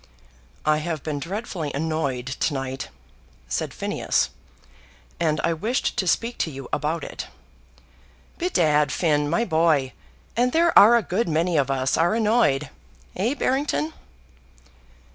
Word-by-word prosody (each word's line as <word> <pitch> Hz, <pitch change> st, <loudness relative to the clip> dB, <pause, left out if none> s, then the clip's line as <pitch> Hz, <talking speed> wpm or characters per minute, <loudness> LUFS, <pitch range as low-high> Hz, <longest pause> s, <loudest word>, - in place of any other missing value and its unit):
"I 155 Hz, 0 st, +3 dB
have 155 Hz, -1 st, -3 dB
been 150 Hz, -2 st, -3 dB
dreadfully 175 Hz, -, -4 dB
annoyed 145 Hz, -5 st, -1 dB
to 135 Hz, +2 st, -1 dB
night," 135 Hz, 0 st, -4 dB, 0.6 s
said -, -, -2 dB
Phineas, -, -, -1 dB, 0.9 s
"and 155 Hz, -2 st, +1 dB
I 170 Hz, -, +2 dB
wished 220 Hz, -, -1 dB
to 185 Hz, -, 0 dB
speak 235 Hz, +6 st, 0 dB
to -, -, 0 dB
you 135 Hz, -3 st, -8 dB
about 155 Hz, +3 st, -1 dB
it." -, -, -6 dB, 1.1 s
"Bedad, 155 Hz, -, +2 dB
Finn, 150 Hz, -4 st, +1 dB
my 170 Hz, +9 st, +1 dB
boy, 160 Hz, -, +2 dB, 0.4 s
and 245 Hz, +2 st, +2 dB
there 335 Hz, +1 st, +3 dB
are 230 Hz, +4 st, +9 dB
a 235 Hz, -, 0 dB
good 185 Hz, +2 st, -1 dB
many 165 Hz, +2 st, +1 dB
of 140 Hz, -3 st, +2 dB
us 135 Hz, -1 st, +1 dB
are 170 Hz, +6 st, +2 dB
annoyed; 210 Hz, -, +2 dB, 0.4 s
eh, 225 Hz, +9 st, 0 dB
Barrington?" 255 Hz, -, 0 dB
160 Hz, 135 wpm, -24 LUFS, 145-210 Hz, 1.1 s, are